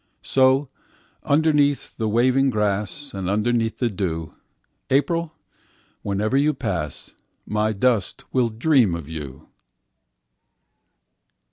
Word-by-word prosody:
So, 135 +1 +3 0.5
underneath 145 -1 +2
the 110 -2 -1
waving 130 +5 +3
grass, 105 +5 -1
And 95 -2 -3
underneath 115 +2 0
the 125 - +1
dew, 80 -5 -3 0.6
April, 165 +4 +1 0.7
whenever 105 +4 -1
you 145 +2 +4
will 150 - -1
pass, 90 - -4 0.3
My 105 +1 0
dust 110 -1 0
will 125 -3 +2
dream 115 - +2
of 85 -4 -7
you! 75 -5 -8
115 Hz, 105 wpm, -23 LUFS, 100-135 Hz, 0.7 s, you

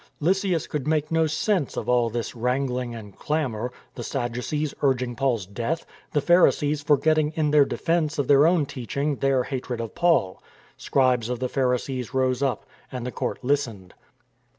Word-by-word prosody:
Lysias 185 0 +1
could 150 -2 -4
make 155 0 0
no 160 0 +3
sense 160 0 0
of - - -3
all 120 -1 +3
this 115 +1 -4
wrangling 125 0 -1
and 105 -4 -10
clamour; 125 -6 -2
— - - -34
the - - -7
Sadducees 135 +4 -2
urging 125 -3 +1
Paul's 125 -7 0
death, 120 - -3 0.3
the 145 - +1
Pharisees 150 -3 +3
forget 155 +2 +3
ting 155 0 +1
in 150 -2 +1
their 150 -2 +6
defence 165 -1 -1
of 140 -3 0
their 145 +2 +6
own 170 -4 +3
teaching 140 +3 -3
their 135 -2 +2
hatred 125 -3 -4
of 115 -2 -5
Paul, 165 - +2 0.3
Scribes 125 -4 +1
of 125 - -1
the 130 +1 -2
Pharisees 130 -1 -1
rose 130 -1 +1
up, 135 -2 -1 0.3
and 125 -2 -5
the 125 - -3
court - - -4
listened. 120 -9 -1
135 Hz, 175 wpm, -25 LUFS, 125-150 Hz, 0.3 s, their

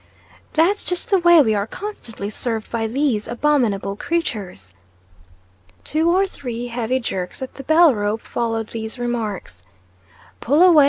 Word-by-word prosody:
"That's 355 +6 +3
just 360 +4 -2
the 390 - +5
way 345 -3 +7
we 220 -4 +2
are 205 0 -1
constantly 230 - -6
served 225 -1 -3
by 225 -1 -1
these 245 -3 0
abominable 235 -7 +1
creatures." 205 - -3 1.1
Two 320 +2 +1
or 375 +3 +4
three 245 -9 -6
heavy 240 +2 -1
jerks 190 0 -4
at 260 - -7
the 275 - -9
bell 315 +1 +6
rope 210 +1 -1
followed 225 -2 -2
these 220 +1 -5
remarks. 215 - -4 0.8
"Pull 290 +8 +3
away! 350 -4 +7
240 Hz, 145 wpm, -21 LUFS, 215-315 Hz, 1.1 s, way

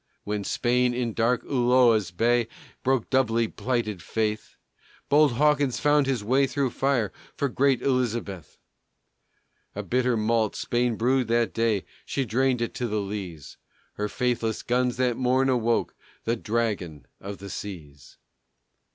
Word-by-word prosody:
When 105 0 -3
Spain, 125 +3 +1
in 120 -2 -2
dark 115 +2 +1
Ulloa's 120 -6 +3
bay, 115 +6 +1 0.3
Broke 130 -3 0
doubly 115 -4 +2
plighted 115 -6 -2
faith, 110 +3 -2 0.5
Bold 145 -2 +5
Hawkins 145 0 +2
fought 145 -1 +3
his 130 -6 -1
way 135 +5 +3
through 135 -2 -1
fire 130 -7 0 0.2
For 140 - +1
great 135 -1 +1
Elizabeth. 115 - -2 1.2
A - - -4
bitter 125 -1 +1
malt 110 0 +1
Spain 120 -1 0
brewed 125 +2 +1
that 115 0 +1
day 115 -4 0 0.2
She 135 - -2
drained 125 +2 +1
it 120 - -4
to 120 - -2
the 105 -1 -1
lees; 95 -8 -6 0.4
Her 105 0 -3
faithless 120 -3 -1
guns 125 0 0
that 125 -2 +1
morn 130 +1 +2
awoke 120 -2 +1 0.3
The 115 - 0
Dragon 105 - -2
of 100 0 -7
the 100 -1 -9
Seas. 75 -10 -9
120 Hz, 140 wpm, -26 LUFS, 105-130 Hz, 1.2 s, Bold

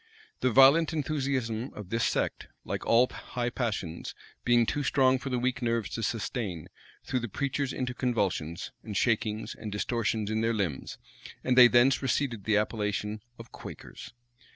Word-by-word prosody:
The 130 - +2
violent 135 +7 +6
enthusiasm 135 -6 -2
of 105 -3 -9
this 115 +1 +1
sect, - - -1 0.2
like - - -4
all 120 +2 +5
high 120 -1 -4
passions, 100 -9 -3 0.3
being 120 -1 +4
too 145 - -1
strong 130 -2 +3
for 135 - -5
the 125 - 0
weak 125 0 -1
nerves 115 -3 -1
to 115 - -3
sustain, 105 - -3 0.3
threw 130 - -1
the 120 -1 -5
preachers 140 +3 -2
into 125 -1 -3
convulsions, 95 - -1
and 105 -3 -5
shakings, 110 -2 0
and 110 -2 -7
distortions 110 0 -1
in 110 0 0
their 115 0 +1
limbs; 90 -10 -3 0.5
and 125 - +2
they 125 -1 +10
thence 120 +3 +4
receded 125 -5 -1
the 105 -1 +3
appellation 105 0 -2 0.2
of 115 0 -12
"Quakers." - - -10
115 Hz, 160 wpm, -29 LUFS, 105-130 Hz, 0.5 s, they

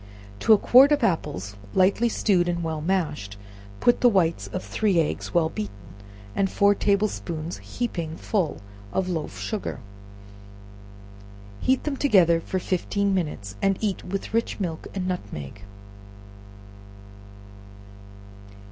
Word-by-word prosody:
To - - +2
a 215 - +9
quart 260 +7 +6
of 290 -3 +2
apples, 100 - -1 0.2
slightly 195 +5 +3
stewed 180 -5 +2
and 170 -1 -1
well 160 -2 -3
mashed, 150 - -2 0.4
put 240 - +3
the 245 - +7
whites 175 -6 +1
of 185 - -5
three 200 -6 +1
eggs, 160 - -1
well 165 -2 +3
beaten, 105 -8 -5 0.6
and 195 -1 +1
four 200 +1 +4
table 200 +1 +2
spoons 170 -4 -5
heaping 170 -9 -4
full 185 - -1 0.3
of 190 -1 -1
loaf 160 -4 -3
sugar, 215 - -4 1.8
heat 260 0 +1
them 295 -2 -2
together 180 - +4
for 185 - -3
fifteen 195 +2 0
minutes, 150 - -3
and 195 -1 +2
eat 205 -3 -2
with 195 +3 -5
rich 230 -1 0
milk 170 -5 -4
and 185 -2 -2
nutmeg. 100 - -5
185 Hz, 130 wpm, -25 LUFS, 160-205 Hz, 1.8 s, a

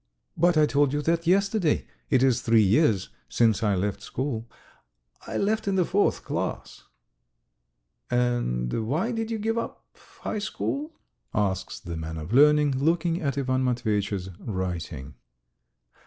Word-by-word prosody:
"But 170 0 +3
I 155 - +6
told 145 -1 +2
you 150 0 -1
that 165 +1 0
yesterday. 195 -2 +2 0.2
It 130 -1 +3
is 130 -2 +3
three 115 -2 +4
years 105 - +3 0.2
since 110 - +2
I 105 -3 +2
left 100 +2 -2
school.... 120 -1 -4 0.8
I - - -3
left 215 +1 0
in 195 - +1
the 185 -2 +3
fourth 200 +4 +1
class." - - -4 1.2
"And 115 - 0
why 165 - 0
did 225 -1 -2
you 225 - -2
give 225 +2 -1
up - - -6 0.4
high 215 - -2
school?" 285 +9 -3 0.4
asks 95 -3 -1
the 85 -1 -6
man 80 0 -5
of 80 +7 -6
learning, 145 0 +5
looking 165 +3 +1
at 140 -3 -1
Ivan 130 -1 0
Matveyitch's 105 -6 -1
writing. 85 - -4
130 Hz, 140 wpm, -26 LUFS, 100-170 Hz, 1.2 s, I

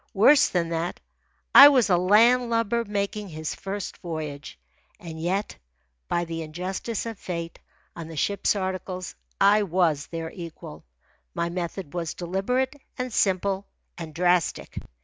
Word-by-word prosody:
Worse 265 +9 +6
than 170 -2 -1
that, 170 +1 -3 0.5
I 280 - +12
was 260 -5 +3
a 185 - +4
land 230 +7 +4
lubber 230 0 +1
making 205 -1 -3
his 155 -1 -5
first 195 0 -6
voyage. 155 -4 -6 0.4
And 160 -2 -8
yet, 190 +5 -2 0.5
by 175 0 0
the 165 0 -5
injustice 185 +8 -4
of 225 -3 -6
fate, 170 -2 -5 0.4
on 165 -2 -7
the 165 - -9
ship's 200 +7 +1
articles 185 -1 -4 0.3
I 205 +2 +5
was 170 -6 +1
their 165 -1 -5
equal. 160 - -10 0.5
My 170 - -1
method 175 -2 -5
was 170 -2 -3
deliberate, 195 - -1 0.2
and 250 -2 -4
simple, 195 0 +1 0.3
and 165 -2 -7
drastic. 175 -1 +1
185 Hz, 140 wpm, -25 LUFS, 165-205 Hz, 0.5 s, I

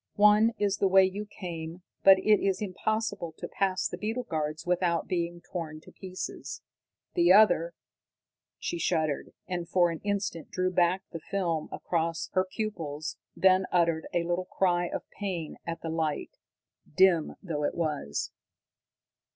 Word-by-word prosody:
"One 210 +2 +5
is 205 -1 +1
the 195 - +3
way 190 0 +6
you 200 +3 -4
came, 170 -3 -7 0.2
but 195 0 +8
it 210 +1 +4
is 195 -1 +1
impossible 210 -3 -2
to - - -5
pass 190 -2 0
the 175 - -7
beetle 225 +5 -2
guards 155 -6 -3
without 175 -1 +1
being 175 -1 -2
torn 160 -3 -6
to - - -15
pieces. 185 -1 -7 0.5
The 175 +1 +4
other 175 -5 +5 0.4
" - - -65
She 170 - -3
shuddered, 155 -3 0 0.2
and 175 -2 -3
for 175 -2 +3
an 165 - -5
instant 200 -5 -2
drew 185 0 0
back 180 +1 +2
the 165 - -5
film 170 -3 -2
from - - -6
across 165 -1 -2
her 185 0 +3
pupils, 165 -9 -4 0.2
then 185 0 +4
uttered 170 -2 +2
a 170 - +1
little 175 +2 -1
cry 175 -2 +1
of - - -5
pain 180 -6 -3
at 165 0 -4
the 165 - -3
light, 160 -2 -1 0.6
dim 185 -4 +4
though 155 -5 -3
it - - 0
was. 150 - -2
175 Hz, 160 wpm, -29 LUFS, 165-190 Hz, 0.6 s, but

